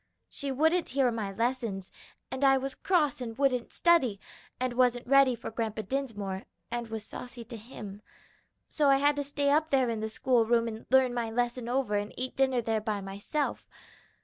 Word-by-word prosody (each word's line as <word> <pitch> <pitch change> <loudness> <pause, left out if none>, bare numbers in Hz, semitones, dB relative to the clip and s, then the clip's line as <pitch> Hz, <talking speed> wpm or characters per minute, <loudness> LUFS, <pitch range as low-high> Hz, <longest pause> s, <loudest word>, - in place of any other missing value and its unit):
She 280 -2 -3
wouldn't 320 +6 +2
hear 260 -2 +2
my 215 -4 -3
lessons, 230 -3 -2 0.4
and 260 +1 -3
I 270 -1 +6
was 270 0 -3
cross 300 -8 +1
and 230 -2 -5
wouldn't 260 -3 +1
study, 265 - +3 0.4
and 255 -1 -1
wasn't 245 -1 +2
ready 270 0 +5
for 230 - -7
Grandpa 220 -1 -3
Dinsmore, 205 -5 -3 0.3
and 240 -1 -3
was 220 -1 -6
saucy 245 0 -8
to 230 +1 -9
him. 210 -3 -9 0.6
So 295 -2 +1
I 275 - +6
had 290 +1 +3
to 285 - 0
stay 285 0 0
up 310 +2 +3
there 265 -4 +3
in 225 - -2
the 220 0 -3
school 245 +1 +2
room 230 +1 +2
and 220 -1 -7
learn 260 -1 +4
my 235 -2 -1
lesson 240 +1 -1
over 245 -5 +1
and 205 +1 -4
eat 255 +1 -2
my 270 - +3
dinner 255 -2 0
there 220 -1 0
by 210 -1 -2
myself. 200 +10 -3
245 Hz, 195 wpm, -29 LUFS, 225-270 Hz, 0.6 s, I